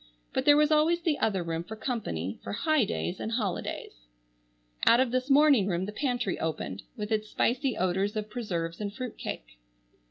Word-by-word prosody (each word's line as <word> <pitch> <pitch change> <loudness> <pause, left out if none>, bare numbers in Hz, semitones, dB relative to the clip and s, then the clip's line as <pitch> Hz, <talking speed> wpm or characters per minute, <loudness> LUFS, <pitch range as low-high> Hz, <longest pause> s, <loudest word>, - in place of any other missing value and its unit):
But - - 0
there 290 0 +7
was 300 +1 +4
always 315 +3 +3
the 315 -4 +1
other 195 -5 +1
room 165 0 -3
for 220 +5 -8
company, 195 - -3
for - - -5
"high 300 +3 +2
days 190 -3 -3
and 225 - -3
holidays." 185 - -3 0.8
Out 235 - +7
of 260 -2 +2
this 255 +2 -1
morning 280 -7 +5
room 180 -1 0
the 205 - -5
pantry 245 -4 -1
opened 145 -11 -3 0.2
with 210 0 -4
its 215 -1 0
spicy 255 +1 0
odors 190 +3 0
of 215 -1 -2
preserves 180 -7 -4
and 205 -1 -2
fruit 250 +1 -6
cake. - - -7
215 Hz, 185 wpm, -29 LUFS, 180-255 Hz, 0.8 s, there